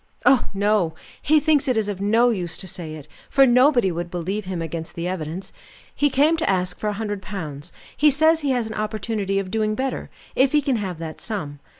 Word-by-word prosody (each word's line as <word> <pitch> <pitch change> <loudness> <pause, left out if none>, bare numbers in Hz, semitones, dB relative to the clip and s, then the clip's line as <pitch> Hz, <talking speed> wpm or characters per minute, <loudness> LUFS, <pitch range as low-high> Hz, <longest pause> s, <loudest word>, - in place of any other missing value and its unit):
"Oh, 270 -4 +5
no! 200 -5 +1 0.3
He 310 +1 +4
thinks 300 -2 +2
it 255 -3 +2
is 215 -2 +1
of 200 -2 -4
no 230 +4 +4
use 180 -6 -3
to - - -6
say 175 -4 -4
it, 155 -1 -11 0.2
for 275 -1 +6
nobody 250 -4 +4
would 170 +1 -4
believe 185 +4 -3
him 185 -2 -4
against 165 0 -5
the 170 +1 -3
evidence. 180 0 -5 0.4
He 290 - +2
came 295 +5 +3
to 320 - 0
ask 180 -1 0
for 215 - -2
a 210 - 0
hundred 205 -2 -3
pounds; 155 -8 -7 0.2
he 300 - +5
says 315 +3 +3
he 285 - -1
has 250 -3 +1
an 220 - -6
opportunity 215 -2 -2
of 195 -2 -2
doing 215 0 0
better, 265 +3 -3 0.3
if 265 +2 +3
he 300 - +4
can 265 -3 +1
have 190 -5 -4
that 160 -1 -7
sum. 150 -10 -4
205 Hz, 220 wpm, -23 LUFS, 180-255 Hz, 0.4 s, for